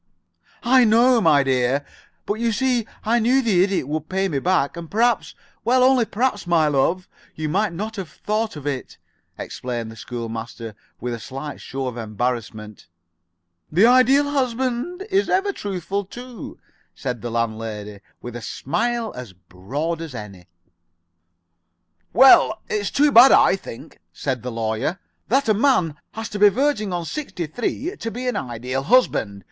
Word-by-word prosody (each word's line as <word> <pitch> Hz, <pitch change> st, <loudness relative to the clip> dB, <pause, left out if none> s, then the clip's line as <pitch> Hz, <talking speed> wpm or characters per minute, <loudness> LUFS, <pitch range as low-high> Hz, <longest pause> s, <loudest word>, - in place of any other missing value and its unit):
"I 255 Hz, +1 st, +5 dB
know, 235 Hz, +2 st, +4 dB
my 150 Hz, -6 st, +4 dB
dear, 130 Hz, +1 st, +1 dB, 0.4 s
but 210 Hz, +2 st, -2 dB
you 235 Hz, 0 st, +1 dB
see 245 Hz, -1 st, 0 dB, 0.2 s
I 235 Hz, +2 st, +2 dB
knew 245 Hz, +4 st, +3 dB
the 190 Hz, -6 st, +3 dB
Idiot 190 Hz, -8 st, -1 dB
would 155 Hz, +1 st, -4 dB
pay 190 Hz, +1 st, 0 dB
me 145 Hz, -5 st, -1 dB
back, 155 Hz, -3 st, +1 dB
and 170 Hz, -1 st, -8 dB
perhaps 235 Hz, +2 st, +1 dB, 0.3 s
well, 250 Hz, +2 st, +3 dB
only 255 Hz, -2 st, +4 dB
perhaps, 220 Hz, -3 st, -1 dB
my 165 Hz, -3 st, +3 dB
love 165 Hz, +6 st, +1 dB, 0.3 s
you 155 Hz, 0 st, -3 dB
might 195 Hz, +5 st, 0 dB
not 215 Hz, +6 st, -5 dB
have 185 Hz, -5 st, -5 dB
thought 215 Hz, -1 st, -3 dB
of 145 Hz, -2 st, -9 dB
it," 140 Hz, -3 st, -4 dB, 0.4 s
explained 120 Hz, -3 st, -5 dB
the -, -, -11 dB
school 120 Hz, 0 st, -6 dB
master, 115 Hz, 0 st, -7 dB, 0.3 s
with 120 Hz, +1 st, -3 dB
a 115 Hz, -, -5 dB
slight 135 Hz, +5 st, -7 dB
show 135 Hz, 0 st, -5 dB
of 125 Hz, -2 st, -4 dB
embarrassment. 110 Hz, -1 st, -4 dB, 0.8 s
"The 180 Hz, +8 st, +5 dB
Ideal 255 Hz, +4 st, +5 dB
Husband 260 Hz, +6 st, -2 dB
is 390 Hz, +1 st, +2 dB
ever 395 Hz, +1 st, +1 dB
truthful, 200 Hz, -, -4 dB
too," 245 Hz, 0 st, -9 dB, 0.4 s
said 125 Hz, -4 st, -4 dB
the 120 Hz, -, -4 dB
landlady, 110 Hz, -3 st, -4 dB, 0.2 s
with 120 Hz, -1 st, -7 dB
a 120 Hz, -, -6 dB
smile 230 Hz, -, -2 dB
as 125 Hz, -6 st, -8 dB
broad 135 Hz, -, -5 dB
as 160 Hz, -6 st, -7 dB
any. 100 Hz, -5 st, -9 dB, 1.6 s
"Well, 245 Hz, -4 st, +6 dB
it's 205 Hz, -2 st, -1 dB
too 290 Hz, +1 st, +3 dB
bad, 250 Hz, +3 st, +9 dB
I -, -, +6 dB
think," 115 Hz, -11 st, -11 dB
said 130 Hz, +7 st, -3 dB
the 125 Hz, -, -5 dB
Lawyer, 115 Hz, -, -2 dB, 0.3 s
"that 270 Hz, +5 st, +2 dB
a 215 Hz, -, +4 dB
man 205 Hz, -, +2 dB, 0.2 s
has 225 Hz, 0 st, -5 dB
to 210 Hz, -, -5 dB
be 205 Hz, 0 st, +8 dB
verging 240 Hz, -3 st, 0 dB
on 175 Hz, -1 st, -3 dB
sixty 270 Hz, -, -4 dB
three 250 Hz, -, -3 dB
to 230 Hz, -, -4 dB
be 250 Hz, +3 st, -5 dB
an 250 Hz, -, 0 dB
Ideal 125 Hz, +2 st, -3 dB
Husband. 135 Hz, -, +2 dB
180 Hz, 165 wpm, -22 LUFS, -, 1.6 s, bad